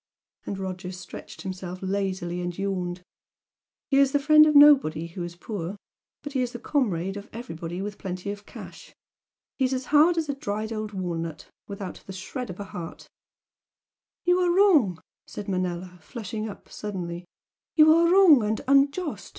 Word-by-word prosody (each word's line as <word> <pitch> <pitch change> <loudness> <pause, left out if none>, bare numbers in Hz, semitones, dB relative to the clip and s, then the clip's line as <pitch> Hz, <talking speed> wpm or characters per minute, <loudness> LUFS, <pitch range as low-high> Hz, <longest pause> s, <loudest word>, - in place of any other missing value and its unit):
and 200 - -3
Roger 185 -1 -5
stretched 180 -1 -10
himself 185 -1 -5
lazily 185 -2 -2
and 175 -1 -4
yawned 185 -2 -3 0.9
"He's 275 0 +4
the - - +5
friend 305 +2 +7
of 300 - +2
nobody 275 - +6
who 170 +2 -8
is 175 0 -5
poor. 185 0 -5 0.5
But 290 - -7
he's 250 -2 -1
the - - -4
comrade 200 - -1
of 200 +1 -9
everybody 175 -6 -6
with 205 0 -6
plenty 185 +1 -4
of 205 0 -9
cash. - - -11 0.6
He's 260 0 +2
as 255 0 -4
hard 320 +4 +6
as 320 -2 0
a 285 - -1
dried 215 -4 -4
old 215 -1 -4
walnut, 165 -5 -5 0.2
without 200 -2 -7
the 190 - -7
shred 230 +7 -6
of 180 - -8
a - - -3
heart 175 -4 -8 0.6
" - - -68
"You 355 0 +4
are 360 -1 +2
wrong!" 325 - +4 0.3
said 205 - -7
Manella, 180 -1 -3
flushing 220 +1 -5
up 200 - -11
suddenly 180 -4 -5 0.5
"You 310 -1 +7
are 335 +1 +4
wrong 360 -9 +7
and 215 +1 0
unjust! 280 +4 +2
200 Hz, 165 wpm, -26 LUFS, 180-275 Hz, 0.9 s, friend